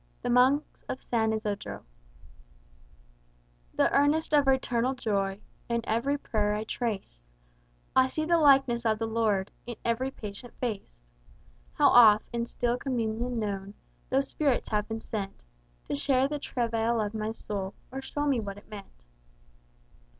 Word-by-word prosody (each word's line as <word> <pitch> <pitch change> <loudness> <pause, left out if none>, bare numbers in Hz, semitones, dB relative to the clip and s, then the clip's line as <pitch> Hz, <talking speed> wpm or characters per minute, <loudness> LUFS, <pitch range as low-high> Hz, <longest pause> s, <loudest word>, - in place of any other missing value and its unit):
The - - 0
Monks 260 +4 +3
of 255 - -3
San 220 -2 0
Isodro 205 - -3 1.9
"The - - +2
earnest 295 +3 +2
of 290 -2 +4
eternal 260 -1 +2
joy 200 -5 -1 0.3
In 235 0 +1
every 235 +6 0
prayer 210 -6 0
I 210 - -2
trace; 200 - -4 0.7
I 260 0 +6
see 310 +4 -2
the 340 +1 +3
likeness 270 -5 +4
of 220 -2 +2
the 225 - -2
Lord 220 -4 0 0.2
In 240 - -5
every 235 +3 0
patient 220 -1 -9
face. 195 - -5 0.7
How - - +5
oft, 215 -3 +7
in 235 0 -1
still 240 0 -1
communion 240 -1 -2
known, 200 -2 -3 0.3
Those 270 +1 +1
spirits 280 -5 0
have 210 -1 0
been 225 0 -4
sent 200 -4 -5 0.4
To - - -2
share 260 - +2
the 295 +1 -3
travail 230 -3 0
of 210 -1 -1
my 215 0 -2
soul, 200 -3 -5 0.2
Or 265 +1 -5
show 290 +2 -3
me 275 -4 +2
what 200 -2 -5
it 205 - -16
meant." 195 - -11
230 Hz, 150 wpm, -28 LUFS, 210-260 Hz, 1.9 s, oft